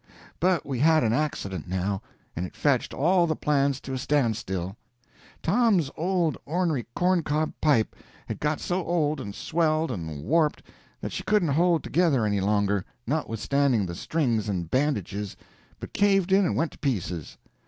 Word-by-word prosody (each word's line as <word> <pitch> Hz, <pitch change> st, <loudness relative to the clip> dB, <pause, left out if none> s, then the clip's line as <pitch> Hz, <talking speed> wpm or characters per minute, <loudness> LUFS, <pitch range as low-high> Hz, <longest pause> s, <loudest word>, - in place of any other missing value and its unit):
But 180 Hz, -3 st, +2 dB
we 135 Hz, -4 st, -3 dB
had 160 Hz, +1 st, +5 dB
an 110 Hz, -1 st, +2 dB
accident, 100 Hz, -, -2 dB
now, 95 Hz, +2 st, -1 dB, 0.3 s
and 85 Hz, -, -2 dB
it 90 Hz, -, -7 dB
fetched 140 Hz, -4 st, +1 dB
all 175 Hz, +4 st, +3 dB
the 160 Hz, -, 0 dB
plans 140 Hz, -2 st, +1 dB
to 135 Hz, -, -6 dB
a 130 Hz, -, -2 dB
standstill. 110 Hz, -, -1 dB, 0.7 s
Tom's 190 Hz, -, +3 dB
old 170 Hz, -3 st, 0 dB
ornery 160 Hz, -5 st, -1 dB
corn 180 Hz, 0 st, +3 dB
cob 155 Hz, 0 st, -1 dB
pipe 140 Hz, -8 st, +2 dB, 0.3 s
had -, -, -5 dB
got 150 Hz, 0 st, 0 dB
so 180 Hz, +1 st, -1 dB
old 155 Hz, -4 st, 0 dB
and 100 Hz, -5 st, -7 dB
swelled 160 Hz, -2 st, 0 dB
and 80 Hz, -, -5 dB
warped 155 Hz, -, +1 dB, 0.4 s
that -, -, -4 dB
she -, -, -3 dB
couldn't 210 Hz, -7 st, +2 dB
hold 170 Hz, +3 st, +3 dB
together 155 Hz, -10 st, +2 dB
any 100 Hz, -2 st, +1 dB
longer, 100 Hz, -1 st, +1 dB, 0.2 s
notwithstanding 135 Hz, -3 st, +1 dB
the 85 Hz, -, -5 dB
strings 115 Hz, -, -1 dB
and 85 Hz, -4 st, -3 dB
bandages, 105 Hz, -, -1 dB, 0.4 s
but -, -, -8 dB
caved 195 Hz, -2 st, +3 dB
in 195 Hz, 0 st, +5 dB
and -, -, -1 dB
went 165 Hz, -, 0 dB
to -, -, -16 dB
pieces. 90 Hz, -, -3 dB
145 Hz, 165 wpm, -26 LUFS, 105-165 Hz, 0.7 s, had